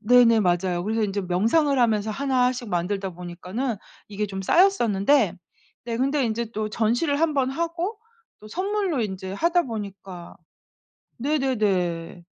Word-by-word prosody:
네네 230 0 +5
맞아요. 175 -1 0
그래서 220 +1 0
이제 205 -1 -1
명상을 225 - +2
하면서 220 -3 +2
1 255 +1 +1
씩 245 -3 -7
만들다 190 +2 -2
보니까는 180 +7 -4 0.3
이게 210 +1 -3
좀 195 -1 -5
쌓였었는데 240 - +3 0.5
네 235 -1 -3
근데 270 +1 +1
이제 230 +1 -2
또 215 -1 -2
전시를 245 +8 +1
1 320 -2 +2
번 265 -2 +1
하고 335 +8 -3 0.4
또 215 - -12
선물로 385 - -1
이제 190 -3 -4
하다 340 - +2
보니까 195 -6 -7 0.8
네네네. 205 - -1
225 Hz, 280 characters per minute, -24 LUFS, 195-275 Hz, 0.8 s, 네네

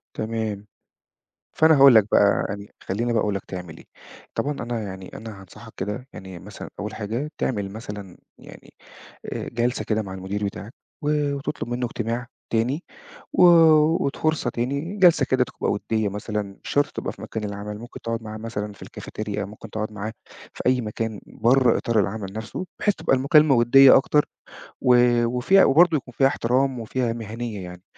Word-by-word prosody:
تمام. 110 -2 -3 0.9
فأنا 160 0 +6
هاقول 135 -2 +8
لك 105 -2 +6
بقى، 100 -1 +4
يعني 100 +1 -7
خلّيني 115 +5 -1
بقى 110 - +2
أقول 105 -1 0
لك 95 - -5
تعمل 90 -3 -8
إيه. - - -15 0.5
طبعًا 145 - -1
أنا 120 -5 -4
يعني، 95 -2 -8
أنا 110 -3 -9
هانصحك 95 - -14
كده، 105 +7 -4
يعني 95 -2 -9
مثلًا - - -10
أول 105 +1 -4
حاجة 115 +8 -4
تعمل 100 -6 -2
مثلًا 105 -4 -8 0.2
يعني - - -15 0.6
آآ - - -5
جَلسة 120 +1 -1
كده 110 0 0
مع 95 -3 -7
المدير 95 +2 -4
بتاعك، 100 +3 -6 0.3
و 150 -1 0
وتُطلب 140 -2 -4
منه 120 +1 -1
اجتماع 115 +1 -3 0.2
تاني، 125 +9 0 0.5
و - - +4 0.6
وت 140 - -2
فرصة 155 -5 0
تاني، 140 - -3
جَلسة 175 -7 +5
كده 130 -1 +2
تبقى - - -3
ودّية 105 0 -1
مثلًا، 105 +1 -3 0.2
مش - - -7
شرط 145 0 +2
تبقى - - -4
في - - -14
مكان 110 - -5
العمل، 105 0 -5
ممكن 120 +1 -10
تقعد 115 0 -3
معاه 110 0 -7
مثلًا 105 -2 -5
في - - -20
الكافتيريا، 105 -1 -5
ممكن 105 +3 -11
تقعد 110 0 -4
معاه 105 +1 -5 0.4
في - - -7
أي 125 0 +3
مكان 110 -1 -4
برّه 125 +1 +3
إطار 115 -2 +1
العمل 100 -1 -2
نفسه، 110 - -5
بحيث 205 -2 +2
تبقى - - +1
المكالمة 140 +2 +5
ودّية 130 +3 +7
أكتر، 150 +2 +2 0.6
و 125 -1 +5 0.3
وفيها 125 +11 +4
وبرضو 160 +3 +5
يكون 125 -2 -9
فيها 135 - +5
احترام 130 0 0
وفيها 115 +1 -2
مهنيّة 115 -2 -6
يعني. 90 0 -10
115 Hz, 175 wpm, -23 LUFS, 105-130 Hz, 0.9 s, هاقول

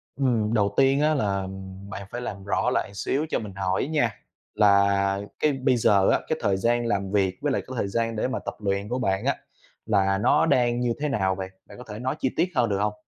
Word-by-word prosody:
Ừm, 115 -5 +1
đầu 100 -3 +2
tiên 135 +1 +4
á 155 +1 +3
là, 100 -7 0
ừm, 95 +1 -8
bạn 100 -2 -7
phải 120 - -4
làm 100 -5 -6
rõ 100 - 0
lại 100 - -1
xíu 135 +9 -1
cho - - 0
mình 105 -4 -7
hỏi 95 +4 -1
nha, 145 -7 +1 0.4
là 100 -1 +3 0.2
cái 155 - +3
bây 130 -1 +1
giờ 100 -3 +4
á, - - +3
cái 160 - 0
thời 95 -1 +1
gian 120 +4 +1
làm 100 -4 -1
việc 95 -2 +1
với 145 - 0
lại - - 0
cái 130 - -7
thời 100 - 0
gian 115 +3 -1
để 110 - 0
mà 130 - -2
tập - - -6
luyện 100 0 -2
của 125 +1 -1
bạn 95 -5 0
á - - +2 0.5
là 95 -2 +2
nó 145 +10 +3
đang 120 -5 +2
như 120 -1 +1
thế 150 0 -1
nào 95 -7 +1
vậy? 95 0 -5 0.2
Bạn - - -13
có 125 - -9
thể 105 +1 -6
nói 130 +1 -2
chi 130 - +1
tiết 170 - +4
hơn 120 -3 +2
được 100 - 0
hông? 105 +1 0
105 Hz, 250 wpm, -25 LUFS, 100-125 Hz, 0.5 s, tiên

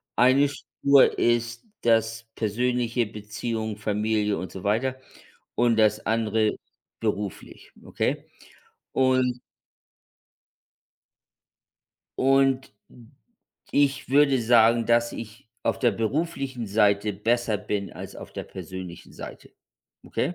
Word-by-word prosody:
Eine 135 +3 +5
Spur 140 -1 +3
ist 120 - 0 0.2
das 115 0 +1
Persönliche, 120 +2 0
Beziehung, 110 +1 -4
Familie 105 0 0
und 90 - -6
so 95 - -9
weiter 130 +6 0 0.6
und 120 -1 +3
das 110 -1 +3
andere 110 -1 +1 0.5
beruflich, 105 -3 -4
okay? - - -2 0.7
Und 130 -1 +2 2.8
und 135 -2 +2 1.0
ich 140 -2 +1
würde 140 -2 +4
sagen, 115 0 +5
dass 120 0 +2
ich 115 +2 -9
auf - - 0
der 120 - +3
beruflichen 135 -1 -2
Seite 100 0 +2
besser 115 +1 +1
bin 105 -1 -3
als - - -9
auf - - -10
der - - -5
persönlichen 90 -2 -9
Seite, - - -10 0.5
okay? 175 - -2
115 Hz, 100 wpm, -25 LUFS, 105-130 Hz, 2.8 s, Eine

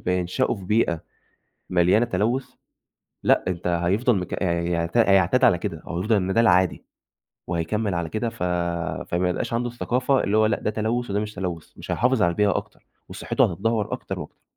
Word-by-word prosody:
بينشأوا 90 +9 0
في 95 -3 -10
بيئة، 90 -6 +1 0.7
مليانة 90 +6 +3
تلوث، 120 +5 0 0.8
لأ - - +3
أنت 90 -1 -3
هيفضل 90 +8 +2
مك 90 +2 -4
هيعت 85 0 -1
هيعتاد 100 0 +4
على 90 - +5
كده 80 -2 -4
هو 85 - -6
هيفضل 105 +5 +2
إن 95 -1 0
ده 115 - +4
العادي، 95 -5 +3 0.6
وهيكمل 95 +5 -1
على 85 -2 -2
كده 110 +7 -2
ف 115 -5 -7 0.7
فما 90 +1 +1
يبقاش 90 - -2
عنده 120 +1 0
الثقافة 125 +2 0
اللي 105 +2 +1
هو 110 - +5
لأ 110 -1 +1
ده - - 0
تلوث 110 +3 -2
وده 100 +1 0
مش 105 0 -4
تلوث 90 -4 -5
مش - - -6
هيحافظ 125 0 +2
على 85 - +4
البيئة 100 +2 +2
أكتر، - - -8 0.2
وصحته - - 0
هتتدهور 110 +3 -1
أكتر - - -5
وأكتر. - - -10
100 Hz, 175 wpm, -24 LUFS, 90-115 Hz, 0.8 s, على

